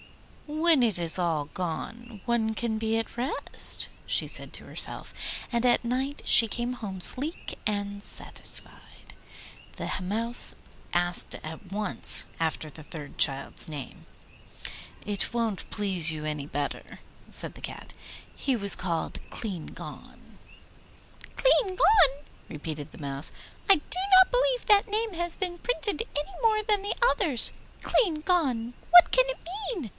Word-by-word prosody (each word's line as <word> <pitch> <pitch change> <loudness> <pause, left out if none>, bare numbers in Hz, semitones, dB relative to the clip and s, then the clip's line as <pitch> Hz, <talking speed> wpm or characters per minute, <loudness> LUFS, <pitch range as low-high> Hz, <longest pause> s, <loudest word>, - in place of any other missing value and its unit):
'When 310 -2 +2
it 215 -7 0
is 170 0 +3
all 165 -5 -1
gone 210 +6 -6
one 225 -2 -1
can 225 -1 -2
be 220 0 -1
at 225 - -5
rest,' 250 +4 -1 0.2
she - - -2
said - - -3
to - - -3
herself, - - -2 0.4
and 235 0 -1
at 240 0 +2
night 265 +4 -3
she 230 - +7
came 240 +3 -3
home 205 -6 -7
sleek 280 - 0
and 205 -1 -3
satisfied. - - -4 0.6
The - - -5
Mouse 225 +6 +2 0.4
asked 175 0 +1
at 160 +4 -10
once 210 0 +8
after 160 -1 -3
the 155 +2 -13
third 150 -2 -11
child's 135 +3 +3
name. 145 -4 -9 1.0
'It 205 +2 -2
won't 230 -5 -3
please 185 -6 +2
you 155 -1 -6
any 150 -2 -4
better,' 145 -1 -6 0.3
said - - +2
the - - -13
Cat, - - -9 0.4
'he 270 -2 -1
was 200 -4 +5
called 170 -2 -3
Clean 195 -8 -6
Gone.' - - -12 1.0
'Cleangone!' 380 - +3 0.2
repeated 150 -1 -7
the - - -14
Mouse. 140 -1 -3 0.4
'I 390 - +9
do 350 +3 -2 0.2
not 375 - +6
believe - - 0
that 415 +2 +4
name 435 0 -1
has 345 0 -2
been 355 -2 -4
printed 455 -2 -1
any 360 +9 -6
more 435 -2 +2
than 415 -2 +1
the 405 - -3
others. 310 - +2 0.3
Cleangone! 305 - 0 0.2
What 355 0 +8
can - - +4
it - - -4 0.4
mean? 285 - -6
235 Hz, 140 wpm, -26 LUFS, -, 1.0 s, I